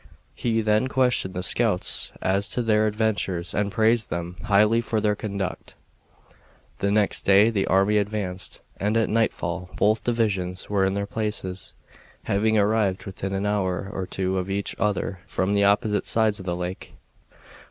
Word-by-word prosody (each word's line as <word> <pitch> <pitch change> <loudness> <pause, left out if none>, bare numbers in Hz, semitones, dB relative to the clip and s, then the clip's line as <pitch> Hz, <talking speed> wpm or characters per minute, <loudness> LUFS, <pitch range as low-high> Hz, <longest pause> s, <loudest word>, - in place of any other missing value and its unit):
He 115 -1 0
then 110 +3 +2
questioned 125 -8 +1
the 90 - -2
scouts 105 -2 +1
as 100 +2 +1
to 125 - -1
their 110 -1 +3
adventures 105 -5 -1
and 100 0 0
praised 110 +3 +2
them 85 +1 -4
highly 105 +3 +4
for 115 -2 -1
their 105 -1 +1
conduct. 100 -3 -5 1.0
The 100 - 0
next 105 0 +2
day 100 +3 +5
the 100 -3 0
army 100 +3 +3
advanced, 100 -3 -4 0.2
and 105 +3 0
at 115 - +1
nightfall 105 -4 -1
both 110 +2 +2
divisions 100 -6 -1
were 100 -2 +2
in 95 0 0
their 100 0 -1
places, 100 -4 -4 0.5
having 110 +2 +1
arrived 105 -2 +1
within 95 -1 -5
an 95 +1 -1
hour 95 -2 -1
or 95 -1 -4
two 95 0 -1
of 90 +1 -4
each 100 +1 -2
other 100 -3 -1
from 95 +2 -1
the 100 0 +3
opposite 105 +1 +2
sides 110 -2 +3
of 95 - -9
the 85 - -1
lake. 90 +1 -6
100 Hz, 165 wpm, -24 LUFS, 95-110 Hz, 1.0 s, day